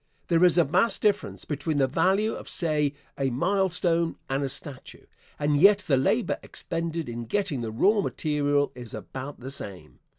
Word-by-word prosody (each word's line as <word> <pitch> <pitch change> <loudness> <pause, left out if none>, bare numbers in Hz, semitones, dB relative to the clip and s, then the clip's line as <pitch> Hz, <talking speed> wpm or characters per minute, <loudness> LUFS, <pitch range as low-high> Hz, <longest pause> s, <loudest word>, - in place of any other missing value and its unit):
There 170 0 +4
is 180 -1 +5
a 170 - +6
vast 185 +8 +1
difference 210 -1 0
between 150 +1 -2
the 135 - +4
value 190 - +1
of, - - -8
say, 150 -4 0 0.2
a 135 -1 +1
milestone 170 +2 +1 0.2
and 135 +1 0
a 135 - -1
statue, 135 0 -6 0.3
and 145 0 +1
yet 200 +5 +6
the 140 - +3
labor 130 - +1
expended 165 -1 -3
in 120 0 -5
getting 140 - -1
the 115 - -3
raw 200 - +3
material 145 -5 0
is 120 -1 -8
about 130 +5 -8
the 130 +2 -6
same. 100 -9 -6
150 Hz, 170 wpm, -26 LUFS, 135-180 Hz, 0.3 s, a